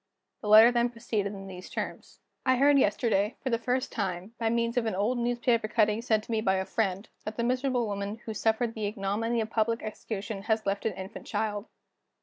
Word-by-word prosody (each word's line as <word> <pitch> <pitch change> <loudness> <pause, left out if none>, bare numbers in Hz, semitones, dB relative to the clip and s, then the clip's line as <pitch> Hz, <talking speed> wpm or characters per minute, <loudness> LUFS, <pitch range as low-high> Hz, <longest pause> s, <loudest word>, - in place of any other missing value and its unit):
The 210 - -5
letter 220 +3 +9
then 240 0 +2
proceeded 225 -4 -2
in 195 0 -8
these 185 -1 -9
terms: - - -6 0.2
"I 260 -1 +4
heard 280 +2 +5
yesterday, 210 -2 +2
for 260 - -1
the 230 - +1
first 250 +2 -1
time, 190 -1 -3
by 225 -1 +1
means 235 +1 0
of 240 -2 +1
an 220 - -1
old 225 +6 0
newspaper 240 -1 +1
cutting 215 -1 +2
sent 220 -3 +1
to 230 - -8
me 220 -1 +1
by 190 -3 +2
a 190 0 -1
friend, 200 -1 -1 0.2
that 215 0 -6
the 235 - 0
miserable 255 0 +1
woman 200 0 -3
who 220 - -4
suffered 225 +2 +1
the 215 -2 -2
ignominy 215 +3 -1
of 220 0 -4
public 230 +1 0
execution 210 -1 -5
has 220 +1 0
left 200 +2 0
an 220 - -2
infant 190 +3 -8
child. 210 -1 -2
220 Hz, 210 wpm, -29 LUFS, 205-235 Hz, 0.2 s, letter